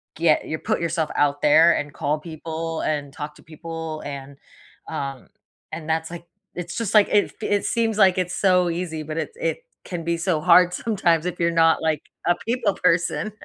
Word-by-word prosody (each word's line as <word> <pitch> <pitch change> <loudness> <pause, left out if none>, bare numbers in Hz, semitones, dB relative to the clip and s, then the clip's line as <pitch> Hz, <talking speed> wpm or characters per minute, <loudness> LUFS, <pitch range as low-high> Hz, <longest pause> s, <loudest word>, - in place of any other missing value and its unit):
get 160 -1 +2
your 155 - -3
put 220 - -1
yourself 165 -2 -1
out 145 0 +1
there 160 +3 +6
and 150 -1 -3
call 145 +3 -1
people 165 0 -5
and 145 -2 -2
talk 150 -1 -7
to - - -18
people 160 0 -7
and 140 -1 -7 0.5
um, 135 -2 -5 0.5
and 155 -1 -6
that's 160 0 0
like 170 0 -9 0.3
it's 175 0 -6
just 230 -4 -2
like 210 -1 +6
it 205 - +2
it 205 -1 0
seems 225 -2 0
like 190 -2 +5
it's 185 0 -1
so 180 -3 +3
easy, 165 -2 -3
but 155 +1 -6
it - - -3
it - - -1 0.3
can 175 -3 -5
be 170 0 -1
so 165 -2 0
hard 180 +1 +6
sometimes 175 -7 +1
if 180 -1 -5
you're 170 0 +2
not 165 -1 +4
like 155 -2 0 0.3
a 175 - +5
people 230 -4 +1
person. 170 +5 +1
165 Hz, 190 wpm, -23 LUFS, 155-180 Hz, 0.5 s, there